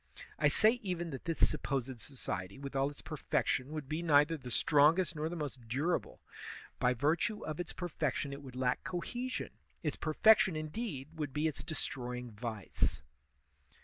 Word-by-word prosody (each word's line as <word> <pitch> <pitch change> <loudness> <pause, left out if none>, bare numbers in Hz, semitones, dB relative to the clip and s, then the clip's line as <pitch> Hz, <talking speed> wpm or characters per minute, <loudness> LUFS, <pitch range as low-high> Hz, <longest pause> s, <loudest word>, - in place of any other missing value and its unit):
I 150 - +5
say 220 - +4
even 175 -5 -2
that 135 - -7
this 165 -1 +4
supposed 135 -4 -2
society, 95 -8 -4
with 140 0 -7
all 135 +1 +2
its 145 - -12
per 155 - -6
fection, 130 0 0
would 155 -3 -4
be 155 +4 -2
neither 150 -1 +5
the 130 -5 -8
strongest 155 +7 +4
nor 155 +1 -1
the 175 - -4
most 135 -7 -5
durable; 145 +9 -1 0.6
by 125 0 +3
virtue 160 - +1
of 155 +1 -4
its 175 - -3
perfection 150 -5 -2
it 140 - -7
would 130 -3 -10
lack 125 -1 0
cohe 185 +9 -3
sion; 255 - -3 0.3
its 150 -3 -1
perfection, 190 +3 +5
indeed, 155 - -4
would 145 -3 -2
be 150 +3 +1
its 155 - -3
destroying 125 -6 -4
vice. 105 - -2
150 Hz, 170 wpm, -34 LUFS, 130-165 Hz, 0.6 s, I